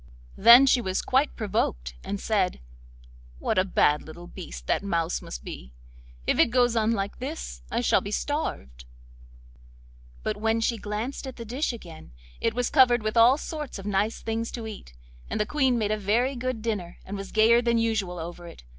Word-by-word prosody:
Then 235 Hz, +5 st, +9 dB
she 260 Hz, -2 st, +4 dB
was 190 Hz, -4 st, -2 dB
quite 265 Hz, +3 st, +1 dB
provoked, 185 Hz, -, -2 dB
and 200 Hz, 0 st, -4 dB
said: 195 Hz, -4 st, 0 dB, 0.8 s
'What 65 Hz, -, 0 dB
a -, -, +4 dB
bad 150 Hz, -5 st, +2 dB
little 170 Hz, +2 st, -11 dB
beast -, -, -9 dB
that -, -, +1 dB
mouse 170 Hz, -4 st, -1 dB
must -, -, -8 dB
be! 60 Hz, 0 st, -9 dB, 0.5 s
If -, -, +1 dB
it -, -, +5 dB
goes 245 Hz, -1 st, +2 dB
on 225 Hz, 0 st, +2 dB
like 200 Hz, -2 st, -3 dB
this 255 Hz, -, -6 dB
I -, -, -1 dB
shall -, -, +3 dB
be -, -, -6 dB
starved.' -, -, -3 dB, 1.4 s
But -, -, -2 dB
when 225 Hz, +1 st, +1 dB
she 230 Hz, +1 st, 0 dB
glanced 215 Hz, +7 st, -4 dB
at 260 Hz, -, -7 dB
the 230 Hz, -, -8 dB
dish 260 Hz, +8 st, -1 dB
again 170 Hz, -, -11 dB, 0.3 s
it 230 Hz, -, 0 dB
was 245 Hz, 0 st, -1 dB
covered 245 Hz, -5 st, +5 dB
with 215 Hz, +1 st, -2 dB
all 235 Hz, +4 st, +6 dB
sorts 300 Hz, -4 st, -6 dB
of 195 Hz, -, -9 dB
nice 205 Hz, +2 st, -1 dB
things 225 Hz, +1 st, -2 dB
to 230 Hz, -2 st, -5 dB
eat, 200 Hz, -, -9 dB, 0.3 s
and -, -, -2 dB
the 210 Hz, -, +2 dB
Queen 265 Hz, -3 st, +1 dB
made 215 Hz, -2 st, 0 dB
a 215 Hz, -, +1 dB
very 235 Hz, +7 st, +1 dB
good 250 Hz, -2 st, -3 dB
dinner, 200 Hz, -7 st, -3 dB
and 200 Hz, -, -6 dB
was 195 Hz, -1 st, -7 dB
gayer 225 Hz, +2 st, +5 dB
than 235 Hz, -1 st, +1 dB
usual 215 Hz, -6 st, 0 dB
over 175 Hz, +1 st, -7 dB
it. 170 Hz, -, -12 dB
215 Hz, 190 wpm, -26 LUFS, 180-240 Hz, 1.4 s, Then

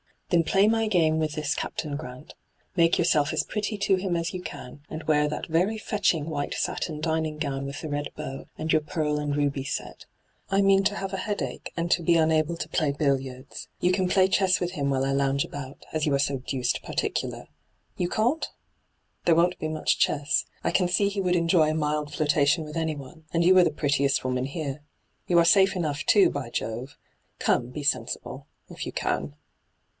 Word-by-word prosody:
Then 170 Hz, -2 st, +4 dB
play 195 Hz, +5 st, +3 dB
my 225 Hz, 0 st, +2 dB
game 160 Hz, -6 st, +2 dB
with 155 Hz, -1 st, -1 dB
this 150 Hz, -2 st, -1 dB
Captain 150 Hz, -2 st, -4 dB
Grant. 130 Hz, -1 st, -9 dB, 0.4 s
Make 165 Hz, 0 st, +4 dB
yourself 155 Hz, -4 st, +2 dB
as -, -, +1 dB
pretty 210 Hz, 0 st, -3 dB
to 195 Hz, -1 st, +3 dB
him 185 Hz, -2 st, -1 dB
as 170 Hz, +2 st, -2 dB
you 180 Hz, -, -4 dB
can, 125 Hz, -6 st, -8 dB
and 155 Hz, 0 st, -6 dB
wear 150 Hz, -1 st, +2 dB
that 150 Hz, -, -4 dB
very 180 Hz, +7 st, +1 dB
fetching 200 Hz, -8 st, 0 dB
white 145 Hz, -2 st, -2 dB
satin 155 Hz, -3 st, -2 dB
dining 160 Hz, -1 st, -1 dB
gown 140 Hz, -2 st, -3 dB
with 140 Hz, +1 st, -6 dB
the 155 Hz, -, -5 dB
red 145 Hz, 0 st, -2 dB
bow, 135 Hz, +1 st, -6 dB
and 160 Hz, 0 st, -2 dB
your 155 Hz, -, +4 dB
pearl 150 Hz, -1 st, -1 dB
and 145 Hz, -1 st, -1 dB
ruby 145 Hz, -2 st, 0 dB
set. -, -, -5 dB, 0.4 s
I 195 Hz, +1 st, +3 dB
mean 195 Hz, 0 st, +4 dB
to 205 Hz, -, +2 dB
have 195 Hz, -1 st, -4 dB
a -, -, -1 dB
headache, 205 Hz, +1 st, -4 dB
and 170 Hz, +1 st, -1 dB
to 175 Hz, -, +3 dB
be 170 Hz, +1 st, +3 dB
unable 160 Hz, 0 st, +2 dB
to -, -, -5 dB
play 155 Hz, -4 st, +1 dB
billiards. 135 Hz, -2 st, -2 dB
You 180 Hz, -, +2 dB
can 185 Hz, 0 st, +1 dB
play 185 Hz, +1 st, +4 dB
chess 190 Hz, -2 st, +3 dB
with 175 Hz, 0 st, -1 dB
him 140 Hz, -6 st, -1 dB
while 135 Hz, -1 st, +1 dB
I 135 Hz, -, 0 dB
lounge 140 Hz, 0 st, +1 dB
about, 140 Hz, -1 st, -8 dB
as 155 Hz, -1 st, 0 dB
you 145 Hz, -2 st, +2 dB
are -, -, +1 dB
so 140 Hz, 0 st, +1 dB
deuced 130 Hz, 0 st, -2 dB
particular. -, -, -3 dB, 0.5 s
You 175 Hz, -, 0 dB
can't? 245 Hz, -, +1 dB, 0.8 s
There 165 Hz, -, +5 dB
won't 175 Hz, +2 st, +2 dB
be 155 Hz, -, -2 dB
much 155 Hz, -1 st, 0 dB
chess. 145 Hz, 0 st, +1 dB, 0.2 s
I -, -, +1 dB
can 180 Hz, -2 st, +2 dB
see 200 Hz, +3 st, +2 dB
he 200 Hz, -1 st, -2 dB
would 180 Hz, -1 st, +1 dB
enjoy 165 Hz, -2 st, +3 dB
a 155 Hz, -, -1 dB
mild 150 Hz, -1 st, -1 dB
flirtation 150 Hz, +1 st, +2 dB
with 150 Hz, +1 st, -7 dB
anyone, 160 Hz, -1 st, -4 dB
and 170 Hz, 0 st, +2 dB
you 185 Hz, +2 st, +6 dB
are 180 Hz, -, +7 dB
the -, -, +3 dB
prettiest 140 Hz, -2 st, +1 dB
woman 130 Hz, 0 st, -1 dB
here. 145 Hz, 0 st, -4 dB, 0.5 s
You 175 Hz, -, +3 dB
are 170 Hz, -, +5 dB
safe 195 Hz, +2 st, +5 dB
enough, 150 Hz, -5 st, -2 dB
too, 195 Hz, -4 st, +5 dB
by 140 Hz, -4 st, -4 dB
Jove 120 Hz, +5 st, -4 dB
I -, -, -17 dB
Come, 120 Hz, -, +2 dB
be 145 Hz, +4 st, -6 dB
sensible 145 Hz, -, -2 dB
— -, -, -42 dB
if -, -, -6 dB
you -, -, -6 dB
can.' 70 Hz, +1 st, -2 dB
155 Hz, 210 wpm, -26 LUFS, 145-180 Hz, 0.8 s, are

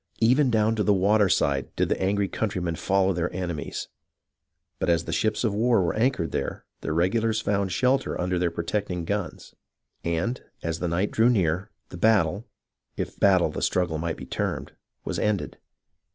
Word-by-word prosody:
Even 130 Hz, +4 st, +4 dB
down 110 Hz, -1 st, +2 dB
to 110 Hz, -, 0 dB
the 105 Hz, -1 st, +3 dB
waterside 95 Hz, -8 st, +2 dB
did -, -, +1 dB
the -, -, -1 dB
angry 100 Hz, +1 st, +1 dB
countrymen 90 Hz, -5 st, -2 dB
follow 95 Hz, +2 st, +2 dB
their 85 Hz, 0 st, -1 dB
enemies; 90 Hz, -4 st, -4 dB, 0.9 s
but -, -, 0 dB
as 85 Hz, -1 st, +3 dB
the 80 Hz, -, -5 dB
ships 110 Hz, +7 st, 0 dB
of 110 Hz, -4 st, +1 dB
war 115 Hz, -1 st, +3 dB
were 85 Hz, -, 0 dB
anchored 115 Hz, -7 st, 0 dB
there, -, -, -3 dB
the -, -, -4 dB
regulars 110 Hz, +7 st, +1 dB
found 100 Hz, -2 st, 0 dB
a -, -, -7 dB
shelter 130 Hz, +5 st, +1 dB
under 90 Hz, 0 st, 0 dB
their 90 Hz, -1 st, +1 dB
protecting 90 Hz, +1 st, -3 dB
guns, 100 Hz, -2 st, -4 dB, 0.5 s
and, 85 Hz, +10 st, -1 dB, 0.2 s
as 85 Hz, 0 st, -2 dB
the 90 Hz, -, -1 dB
night 90 Hz, +5 st, 0 dB
drew 115 Hz, +2 st, +4 dB
near, 95 Hz, -3 st, +1 dB, 0.2 s
the 90 Hz, -, -8 dB
battle, 100 Hz, 0 st, +2 dB, 0.5 s
if -, -, -4 dB
battle 95 Hz, -3 st, +4 dB
the -, -, -5 dB
struggle 85 Hz, -4 st, 0 dB
might 85 Hz, 0 st, -2 dB
be -, -, -8 dB
termed, -, -, -3 dB, 0.3 s
was -, -, -2 dB
ended. 105 Hz, -2 st, -1 dB
95 Hz, 175 wpm, -26 LUFS, 85-110 Hz, 0.9 s, Even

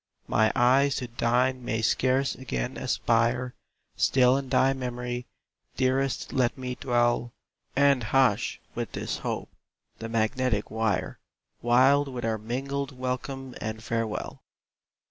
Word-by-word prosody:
My 110 Hz, 0 st, +3 dB
eyes 130 Hz, +2 st, +4 dB
to 125 Hz, -, -3 dB
thine 125 Hz, +2 st, +1 dB
may 110 Hz, -1 st, -2 dB
scarce 130 Hz, +3 st, +2 dB
again 65 Hz, -, -4 dB
aspire 120 Hz, +2 st, +1 dB, 0.4 s
Still 125 Hz, -1 st, +4 dB
in 135 Hz, -1 st, -3 dB
thy 135 Hz, +1 st, +3 dB
memory, 125 Hz, -1 st, -4 dB, 0.5 s
dearest 130 Hz, +1 st, 0 dB
let 130 Hz, -2 st, +1 dB
me 125 Hz, -1 st, -4 dB
dwell, 120 Hz, -1 st, +1 dB, 0.4 s
And 140 Hz, -3 st, +4 dB
hush, 125 Hz, -2 st, +2 dB
with -, -, -4 dB
this -, -, -3 dB
hope, -, -, -4 dB, 0.5 s
the 115 Hz, -, -5 dB
magnetic 115 Hz, 0 st, 0 dB
wire, 110 Hz, -3 st, -1 dB, 0.4 s
Wild 130 Hz, +4 st, +4 dB
with 125 Hz, -3 st, -5 dB
our 110 Hz, -1 st, -1 dB
mingled 135 Hz, +4 st, -4 dB
welcome 130 Hz, +1 st, -4 dB
and 110 Hz, +1 st, -4 dB
farewell! 115 Hz, -1 st, -3 dB
125 Hz, 125 wpm, -27 LUFS, 115-130 Hz, 0.5 s, eyes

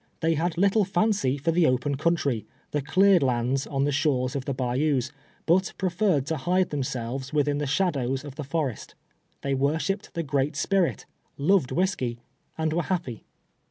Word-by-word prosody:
They 165 Hz, 0 st, +2 dB
had 165 Hz, +2 st, -1 dB
little 200 Hz, +2 st, +3 dB
lancy 175 Hz, -9 st, +2 dB
for 140 Hz, +5 st, +1 dB
the 170 Hz, 0 st, +3 dB
o})en 130 Hz, +2 st, +1 dB
country, 140 Hz, -6 st, 0 dB, 0.2 s
the 150 Hz, -, 0 dB
cleared 190 Hz, +5 st, +4 dB
lands 130 Hz, +1 st, 0 dB
on 135 Hz, -1 st, -1 dB
the 145 Hz, -, +1 dB
shores 135 Hz, -3 st, 0 dB
of 135 Hz, -2 st, -3 dB
the 140 Hz, -, -1 dB
bayous, 130 Hz, +1 st, 0 dB, 0.4 s
hut 185 Hz, +3 st, +3 dB
preferred 180 Hz, -6 st, +1 dB
to 160 Hz, +1 st, -2 dB
hide 180 Hz, +6 st, +1 dB
themselves 130 Hz, -1 st, -3 dB
within 145 Hz, -1 st, +1 dB
the 150 Hz, -, -2 dB
shadows 135 Hz, -5 st, 0 dB
of 145 Hz, -, -7 dB
the 150 Hz, +2 st, -6 dB
forest. 140 Hz, -4 st, -3 dB, 0.5 s
Tliey 140 Hz, -1 st, 0 dB
worshiped 155 Hz, +8 st, -1 dB
the 170 Hz, -, -1 dB
Great 145 Hz, 0 st, 0 dB
Spirit, 185 Hz, +3 st, 0 dB, 0.3 s
loved 150 Hz, -1 st, +2 dB
whisky, 130 Hz, -10 st, 0 dB, 0.4 s
and 160 Hz, -1 st, 0 dB
were 170 Hz, -, +1 dB
happy. 165 Hz, -, -3 dB
145 Hz, 165 wpm, -26 LUFS, 135-175 Hz, 0.5 s, cleared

